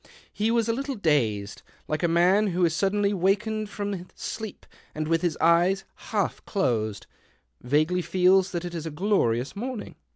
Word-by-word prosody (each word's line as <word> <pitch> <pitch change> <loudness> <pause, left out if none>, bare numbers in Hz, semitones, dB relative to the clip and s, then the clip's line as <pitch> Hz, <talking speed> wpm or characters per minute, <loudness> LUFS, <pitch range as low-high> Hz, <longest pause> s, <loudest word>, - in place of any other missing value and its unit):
He 215 +2 0
was 230 -1 +2
a 230 - +1
little 275 +2 -3
dazed, 115 - 0 0.3
like 155 - -2
a 170 - +3
man 180 +5 +4
who 180 -1 +2
is 165 - +1
suddenly 200 +4 +1
wakened 205 +3 0
from 200 -4 -4
sleep 220 -3 -6 0.3
and 155 0 -2
with 165 0 +2
his 175 -3 0
eyes 175 +4 +3 0.3
half 205 -4 -1
closed 110 - -1 0.6
vaguely 155 +8 +1
feels 185 +1 +3
that 175 -2 -4
it 175 - -6
is 165 -1 -4
a - - -2
glorious 150 - 0
morning. 240 +1 -5
180 Hz, 165 wpm, -26 LUFS, 160-205 Hz, 0.6 s, man